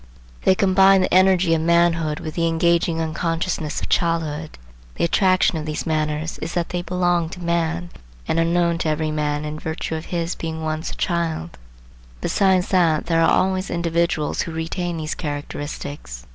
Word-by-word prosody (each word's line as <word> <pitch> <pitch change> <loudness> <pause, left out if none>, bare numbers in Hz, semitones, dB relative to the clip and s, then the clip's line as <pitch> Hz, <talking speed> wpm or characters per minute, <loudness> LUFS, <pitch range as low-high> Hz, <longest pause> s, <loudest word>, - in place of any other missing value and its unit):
They 185 - +5
combine 195 0 +5
the 185 - 0
energy 185 -2 +4
of 160 - +1
manhood 165 -2 +2
with 155 - -6
the 170 -1 +1
engaging 165 0 +2
unconsciousness 165 0 -2
of - - -5
childhood. 160 -2 -1 0.4
The - - -2
attraction 185 -1 +3
of 155 - -6
these 150 - -3
manners 155 0 -1
is 165 - -5
that 175 -1 -1
they 180 - -2
belong 175 -2 0
to 180 - -9
man, 170 0 -1 0.4
and 165 - +1
are - - +4
known 170 0 +1
to 165 - 0
every 155 0 -1
man 150 -1 -1
in 150 0 -5
virtue 160 0 -4
of 160 0 -4
his 170 0 -2
being 160 -1 -5
once 155 +1 -2
a - - -7
child; 165 - -2 0.6
besides 190 - +2
that 170 -5 +2
there 165 -1 +2
are 165 - +4
always 185 0 +1
individuals 170 -2 0
who 170 - -4
retain 165 +2 -3
these 155 0 -3
characteristics. 145 - -6
165 Hz, 175 wpm, -22 LUFS, 155-175 Hz, 0.6 s, They